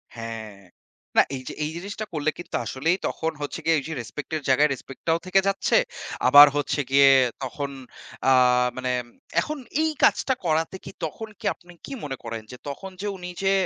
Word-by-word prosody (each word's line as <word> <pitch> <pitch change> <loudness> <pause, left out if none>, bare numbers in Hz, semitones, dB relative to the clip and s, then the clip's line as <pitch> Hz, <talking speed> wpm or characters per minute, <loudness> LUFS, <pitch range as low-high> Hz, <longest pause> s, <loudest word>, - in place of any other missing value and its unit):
হ্যাঁ। 115 -2 -6 0.7
না - - +9
এইযে 130 -1 -7
এই 150 - -2
জিনিসটা 205 +4 -5
করলে 155 -1 0
কিন্তু 175 - -6
আসলেই 160 +7 0
তখন 160 0 -2
হচ্ছে 145 - -4
গিয়ে 165 0 +4
এইযে 160 +4 -6
রেসপেক্টের 150 +6 -5
জায়গায় 145 +3 +5
রেসপেক্টটাও 150 +5 -3
থেকে 185 +1 +4
যাচ্ছে। 195 0 +2 0.5
আবার 145 +3 +11
হচ্ছে 145 0 0
গিয়ে 140 0 +7 0.3
তখন 140 +2 -4 0.6
আ - - +6 0.5
মানে 130 0 -1 0.5
এখন 305 0 -4 0.2
এই 320 - +2
কাজটা 265 - +4
করাতে 160 +2 +1
কি? - - -8
তখন 220 +8 -6
কি - - -11
আপনি 175 0 -17
কি - - -10
মনে 135 -2 -4
করেন? 115 -1 -5
যে 125 - -9
তখন 190 +7 -7
যে 210 - -2
উনি 180 -1 -7
যে 195 - +3
150 Hz, 170 wpm, -25 LUFS, 135-175 Hz, 0.7 s, আবার